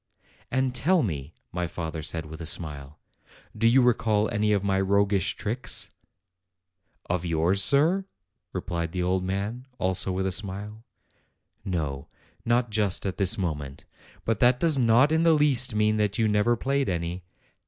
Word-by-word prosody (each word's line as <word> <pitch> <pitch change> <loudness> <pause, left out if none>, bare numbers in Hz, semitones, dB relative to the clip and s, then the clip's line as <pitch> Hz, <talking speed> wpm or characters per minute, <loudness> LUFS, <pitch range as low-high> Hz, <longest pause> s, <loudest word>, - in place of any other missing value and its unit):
"And 130 -1 0
tell 165 +7 +2
me," 75 - -4 0.2
my 90 0 -2
father 80 -1 -5
said, 80 +1 -3
with 80 +2 -9
a - - -5
smile, 75 -4 -3 0.6
"do 115 +1 +2
you 125 +2 +5
recall 110 -3 +2
any 105 -1 +1
of 100 -2 +1
my 95 -1 +1
roguish 100 0 +1
tricks?' 110 -2 -3 1.1
1 90 - 0
"Of 85 - -10
yours, 85 +4 +1
sir?" 165 +8 +3 0.5
replied 85 -1 -4
the 90 -1 -1
old 90 +1 0
man, 100 +7 -4
also 95 0 0
with 95 +1 -2
a 95 - 0
smile. 105 +3 -4 0.8
"No; 80 -7 -3 0.4
not 120 0 +1
just 105 -3 0
at 95 - -3
this 95 -2 +3
moment. 75 -7 -4 0.4
But 110 -3 0
that 125 +1 +4
does 155 -3 +2
not 120 +4 +4
in 160 +1 +2
the 165 -1 +5
least 135 -6 +3
mean 105 0 +2
that 105 -2 0
you 115 -2 +2
never 105 +3 +2
played 140 +1 0
any. 85 +1 -3
100 Hz, 165 wpm, -26 LUFS, 90-120 Hz, 1.1 s, you